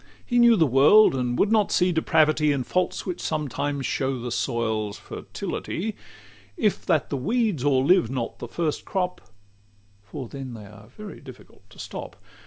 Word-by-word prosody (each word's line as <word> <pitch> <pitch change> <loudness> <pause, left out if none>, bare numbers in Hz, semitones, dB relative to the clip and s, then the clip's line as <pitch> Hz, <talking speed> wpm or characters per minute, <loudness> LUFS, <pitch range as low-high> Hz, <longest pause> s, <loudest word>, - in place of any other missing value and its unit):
He 245 -1 +1
knew 235 -1 +7
the 165 -6 +4
world, 145 - +6
and 125 -2 -1
would 205 - +2
not 215 -2 +3
see 180 0 +3
depravity 155 -2 +2
In 140 -3 -1
faults 180 +7 -1
which 180 -2 -4
sometimes 145 -2 -2
show 135 -2 -1
the 120 0 -5
soil's 110 -4 -2
fertility, 215 +4 -5 0.6
If 210 - 0
that 155 - +1
the 140 - -1
weeds 210 - 0
o'erlive 140 0 +3
not 125 -3 -4
the 120 - -6
first 155 +4 -2
crop 180 -2 -2 0.8
For 115 +6 -8
then 130 -1 -7
they 105 -2 -10
are 105 0 -14
very 205 - -10
difficult 130 -4 -15
to - - -18
stop. - - -7
145 Hz, 165 wpm, -25 LUFS, 125-180 Hz, 0.8 s, knew